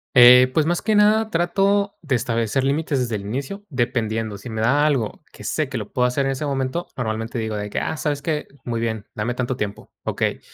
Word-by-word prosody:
Eh, 125 +1 +9
pues, 155 +1 +3
más 175 +1 0
que 215 0 +1
nada, 215 +1 +4
trato 195 +3 +1
de 145 -5 0
establecer 115 +1 0
límites 140 0 0
desde 120 -3 -1
el 100 - -3
inicio, 135 - -5
dependiendo. 115 -5 -1
Si 120 +5 -9
me 110 0 -3
da 145 +6 +3
algo 135 0 -1
que - - -13
sé 155 -4 -1
que 130 - -3
lo 105 -3 -6
puedo 125 -1 +2
hacer 135 +3 0
en 135 - +1
ese 135 +3 -3
momento, 135 +4 -2
normalmente 115 +1 -3
digo 110 -1 -2
de 105 0 -4
que: - - -2
"Ah, 160 - -2
¿sabes 145 -2 -1
qué? 155 -2 -2 0.2
Muy 115 -2 -2
bien, 110 -2 -2
dame 115 +3 -1
tanto 125 0 -1
tiempo, 105 -1 -5
okey". - - -1
130 Hz, 220 wpm, -22 LUFS, 115-150 Hz, 0.2 s, Eh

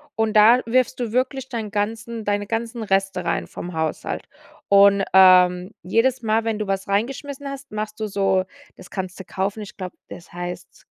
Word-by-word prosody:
und 220 -1 0
da 225 +3 +7
wirfst 255 +2 +1
du 235 -3 -2
wirklich 260 +2 -1
deinen 220 -4 -4
ganzen 225 +2 -3
deine 205 0 -1
ganzen 230 +1 -3
Reste 195 -2 0
rein - - -1
vom 180 - -7
Haushalt. 160 -1 -3 0.5
Und, 200 0 +6
ähm, 180 -1 +6
jedes 240 +7 +1
Mal, 220 0 +1
wenn 220 -2 -1
du 210 - -3
was 195 0 -2
reingeschmissen 275 +7 -2
hast, 275 -2 -9
machst 215 0 -5
du 215 - -2
so 195 -2 +1 0.3
das - - -13
kannst 190 -1 -5
du 190 - -8
kaufen, 195 +4 -3
ich 205 - -9
glaube, 185 -2 -7
das 175 - -11
heißt 175 0 -8
210 Hz, 180 wpm, -22 LUFS, 190-230 Hz, 0.5 s, da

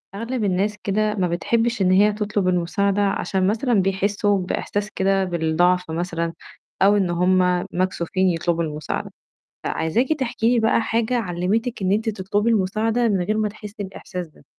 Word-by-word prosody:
أغلب 230 +3 -3
الناس 200 +2 0
كده 210 +1 0
ما 185 -3 +1
بتحبش 225 +6 0
إن 185 -1 +3
هي 205 +3 +5
تطلب 210 -2 -1
المساعدة، 190 +3 +1
عشان 195 -1 0
مثلًا 230 +5 0
بيحسوا 200 +1 +1
بإحساس 205 +3 -3
كده 195 0 +1
بالضعف 175 0 +1
مثلًا 170 0 -2 0.5
أو 200 +2 +5
إن 190 -3 +1
هُم 180 0 +2
مكسوفين 185 0 0
يطلبوا 170 0 0
المساعد 150 -1 -4 0.5
فعايزاكِ 220 +11 0
تحكي 235 -2 +1
لي 240 - +3
بقى 225 +1 +2
حاجة 230 +2 0
علِّمتِك 210 +4 -1
إن 190 0 +1
أنتِ 220 +3 +1
تطلبي 205 +2 -1
المساعدة 220 +3 +1
من 200 -4 +1
غير 215 +4 -1
ما 215 -1 +1
تحسي 210 0 -10
الإحساس 180 -2 -7
ده؟ 155 - -22
195 Hz, 155 wpm, -22 LUFS, 180-215 Hz, 0.5 s, هي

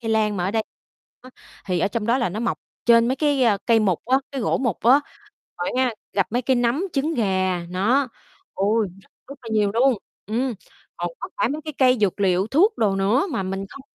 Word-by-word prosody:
cây 225 -2 -3
lan 215 -2 +1
mà 180 - -1
ở 190 - 0
đây 220 +1 0 0.6
á, 255 - -13 0.4
thì 180 -2 0
ở - - +2
trong 215 +1 -3
đó 240 +3 +2
là 240 - 0
nó 210 +5 -5
mọc 235 - -1 0.3
trên 235 0 +5
mấy 260 - 0
cái, 290 -3 +1
a, 210 -4 +4
cây 230 -2 +4
mục 190 -5 0
á, 260 +1 +4
cái 270 - -3
gỗ - - 0
mục 240 -8 -1
á. 255 +5 +6 0.6
Rồi - - -2
á 260 - +3
nha, 250 - +1 0.2
gặp 195 -2 +1
mấy 245 +2 0
cái 260 +1 +2
nấm, 245 +9 +1
trứng 305 +4 0
gà, 190 - 0
nó, 240 +9 +1 0.5
ôi, 210 +1 +1
rất - - -26 0.2
rất 280 0 -10
là 230 - -9
nhiều 210 -2 +2
luôn, 255 +2 +4 0.3
ừm, 240 +4 -1 0.4
còn - - -2
có - - -5
cả - - +2
mấy 300 +2 -3
cái 310 - -5
cây 255 -2 +4
dược 200 -1 +1
liệu, 190 0 +2
thuốc 375 - +3
đồ 200 -3 +2
nữa 210 - +2
mà 195 - -1
mình 195 +1 -4
không 275 - -11
230 Hz, 235 wpm, -23 LUFS, 200-260 Hz, 0.6 s, á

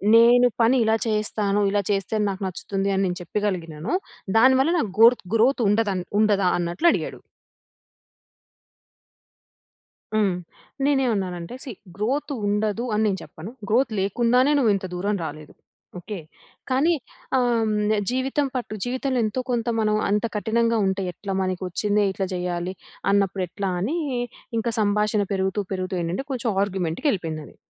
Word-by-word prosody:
నేను 240 +2 +7
పని 230 +3 +5
ఇలా 220 0 +3
చేస్తాను. 210 -1 0
ఇలా 205 +1 +1
చేస్తే 195 +1 -1
నాకు 195 -1 -3
నచ్చుతుంది 195 +2 -2
అని 195 0 +1
నేను 180 -1 -2
చెప్పగలిగినాను. 175 - -3 0.4
దానివల్ల 260 +5 +5
నాకు 220 - -1
గోర్‌త్ 230 -2 +6
గ్రోత్ 240 +3 +3
ఉండ‌దన్ 205 -4 +1 0.2
ఉండదా 205 -3 +3
అన్నట్లు 175 - 0
అడిగాడు. - - -3 3.0
హ్మ్. 210 -3 +3 0.5
నేనేవన్నానంటే 215 -9 0
సీ 265 - -6 0.2
గ్రోత్ 255 +9 -1
ఉండదు 210 +3 0
అని 215 +1 +2
నేను 195 -2 0
చెప్పను. 160 +6 -9 0.2
గ్రోత్ 240 +3 +3
లేకుండానే 240 +7 +2
నువ్వు 240 -6 +4
ఇంత 190 - -4
దూరం 200 +3 -1
రాలేదు 155 -1 -8 0.5
ఓకే. 205 +4 -6 0.5
కానీ 270 +6 +3 0.5
ఆహ్, 250 - +3
హ్మ్, 215 -1 +1 0.2
జీవితం 265 +3 0
పట్టు 245 -4 -3
జీవితంలో 255 +1 -1
ఎంతో 215 +4 -2
కొంత 235 -1 -1
మనం 215 -1 +2
అంత 210 +3 +1
కఠినంగా 230 +2 +1
ఉంటే 190 0 -1
ఎట్లా 195 +3 -6
మనకు 185 0 -2
వచ్చింది 205 +3 +1
ఇట్లా 190 0 -2
చేయాలి 180 0 -2 0.4
అన్నప్పుడు 195 -2 +1
ఎట్లా 195 +3 -3
అని 270 - -1 0.6
ఇంకా 235 +1 -1
సంభాషణ 210 0 +2
పెరుగుతూ, 190 +1 0
పెరుగుతూ 185 0 -3
ఏంటంటే 175 +10 -3
కొంచెం 245 -3 -1
ఆర్గ్యుమెంట్‌కి 190 - -1
ఎళ్ళిపోయిందది. 160 -5 -5
210 Hz, 135 wpm, -24 LUFS, 190-235 Hz, 3.0 s, నేను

